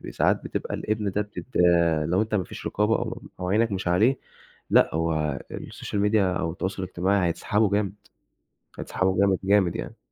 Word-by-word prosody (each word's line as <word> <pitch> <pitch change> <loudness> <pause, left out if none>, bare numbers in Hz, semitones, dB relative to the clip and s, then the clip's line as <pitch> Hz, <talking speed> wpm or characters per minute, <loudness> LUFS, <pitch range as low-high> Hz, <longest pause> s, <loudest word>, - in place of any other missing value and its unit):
ب - - -8
ساعات - - +1
بتبقى - - -4
الابن 105 -2 -2
ده 105 - -1
بتت 105 0 -9 0.6
لو 90 +5 +2
أنت 110 0 -3
ما 95 - +1
فيش - - -9
رقابة، 105 +2 +1
أو - - -4 0.2
أو 90 - -2
عينك 110 +2 +2
مش 95 -2 -2
عليه، 110 +10 +3 0.5
لأ، - - +4
هو 80 -3 0 0.2
الSocial 105 - -5
Media 110 - +2
أو 90 -5 +1
التواصل 95 +2 -4
الاجتماعي 95 0 +1
هتسحبه 105 +4 +1
جامد، 100 -2 0 0.9
هتسحبه 95 0 -1
جامد، 100 -2 +3
جامد 95 -3 +3
يعني. - - -6
95 Hz, 170 wpm, -25 LUFS, 90-105 Hz, 0.9 s, لأ